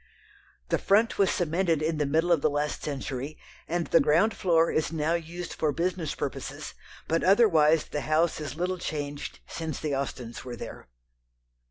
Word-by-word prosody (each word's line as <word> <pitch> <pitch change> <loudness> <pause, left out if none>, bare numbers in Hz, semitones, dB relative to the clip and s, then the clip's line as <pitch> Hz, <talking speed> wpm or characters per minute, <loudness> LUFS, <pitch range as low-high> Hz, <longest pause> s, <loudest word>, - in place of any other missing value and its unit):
The - - +2
front 215 +3 +3
was 195 - +4
cemented 170 -2 +1
in 155 0 0
the 150 - +1
middle 160 +4 +2
of 165 -4 +4
the - - +3
last 145 +1 -2
century, 140 0 -4 0.3
and 170 0 -1
the 165 - +4
ground 170 +9 +3
floor 165 -2 +3
is 155 0 0
now 160 0 0
used 170 +1 -4
for 155 - 0
business 170 -1 -2
purposes, - - -5 0.3
but 165 +1 +1
otherwise 165 -7 +5
the 150 - -4
house 155 +3 +1
is 150 -1 -5
little 180 +2 -2
changed 145 -3 -5
since 160 -4 -5
the 150 -2 -2
Austens 125 -3 -5
were 125 -2 -6
there. 115 - -9
160 Hz, 170 wpm, -27 LUFS, 150-175 Hz, 0.3 s, otherwise